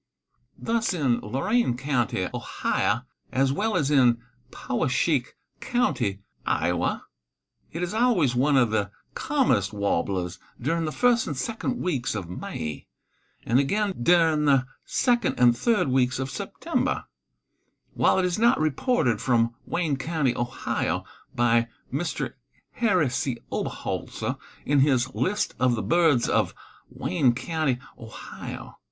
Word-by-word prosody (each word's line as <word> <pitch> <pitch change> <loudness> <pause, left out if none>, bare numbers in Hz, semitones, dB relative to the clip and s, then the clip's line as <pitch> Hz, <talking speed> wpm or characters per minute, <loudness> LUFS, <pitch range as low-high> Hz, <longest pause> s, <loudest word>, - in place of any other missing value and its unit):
Thus, 230 -4 0
in 135 -8 +1
Lorain 135 - 0
county, 120 -9 0
Ohio, - - -1 0.3
as 135 +1 +2
well 215 +7 0
as 150 -4 +1
in 125 -5 +5 0.3
Poweshiek 130 +1 0 0.2
county, 120 - 0 0.2
Iowa, 85 +1 0 0.7
it 165 +3 -4
is 180 - -3
always 220 - +3
one 135 +3 +3
of 120 -4 +3
the 105 -2 0 0.2
commonest 100 +1 +1
warblers 95 -3 -1 0.2
during 165 +6 0
the 155 - -2
first 240 +4 +2
and 145 - -3
second 230 - -2
weeks 135 -11 -1
of 95 -5 -4
May, 80 -4 -5 0.6
and 120 +3 +3
again 200 +8 +1
during 160 0 +4
the 135 -3 +4 0.2
second 240 -5 +1
and 120 -1 +6
third 215 - +2
weeks 130 -1 +2
of 130 +1 -3
September, - - -2 0.9
while - - +3
it 190 - +2
is 180 +2 -1
not 235 +1 +4
reported 155 - +1
from 115 -2 +2
Wayne 160 -6 0
county, 145 -4 0
Ohio, 120 0 -2 0.3
by 120 -1 +3 0.3
Mr. 160 +4 -2 0.4
Harry 185 - +2
C. 125 -1 -1
Oberholser - - -3 0.3
in 145 0 +3
his 130 -2 +2
"List 205 +3 0
of 125 -1 +3
the 110 - -3
Birds 150 - +3
of - - +1 0.3
Wayne 120 +6 +1
county, 155 -2 -1 0.2
Ohio." 110 -1 -9
135 Hz, 130 wpm, -26 LUFS, 120-175 Hz, 0.9 s, and